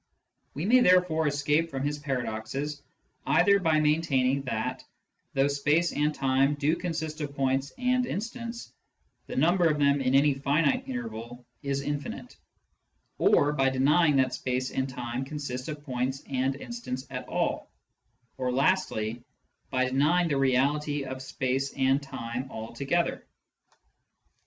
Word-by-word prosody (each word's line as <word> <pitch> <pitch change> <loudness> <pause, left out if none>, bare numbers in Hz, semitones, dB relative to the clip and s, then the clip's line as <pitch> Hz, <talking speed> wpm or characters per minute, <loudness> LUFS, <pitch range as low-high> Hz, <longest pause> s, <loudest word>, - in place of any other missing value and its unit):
We 150 +5 -3
may 250 +5 +6
therefore 180 -7 +4
escape 145 +3 +1
from 135 -2 -4
his 145 +1 -2
paradoxes 135 +2 -3 0.5
either 200 -1 +5
by 160 -4 +2
maintaining 145 -4 +2
that, 125 +2 -3 0.5
though 135 +1 +4
space 145 +4 +2
and 150 +1 +1
time 135 +1 +2
do 145 +3 +1
consist 160 -3 -4
of 140 -1 -5
points 135 0 0
and 250 0 +1
instants, 235 +2 -5 0.5
the - - -6
number 170 +4 +3
of 150 - +1
them 140 -1 +3
in 130 0 +2
any 140 +1 +5
finite 140 +2 +1
interval 120 0 -6 0.2
is 140 -1 -2
infinite; 145 0 -5 0.8
or 145 +1 +4
by 135 -2 +2
denying 145 +4 +3
that 130 -1 +2
space 130 0 -2
and 135 0 -1
time 125 0 -4
consist 135 -3 -5
of 150 -1 -6
points 130 0 -2
and 135 0 0
instants 140 - -6
at 125 -1 -6
all; - - -1 0.7
or 125 -1 0
lastly, 120 - 0 0.5
by 130 0 +1
denying 150 +7 +2
the 140 - +1
reality 140 +2 +1
of 130 -1 -6
space 135 +1 -2
and 135 +1 +2
time 125 -1 -5
altogether. 135 +10 -2
140 Hz, 135 wpm, -28 LUFS, 130-150 Hz, 0.8 s, may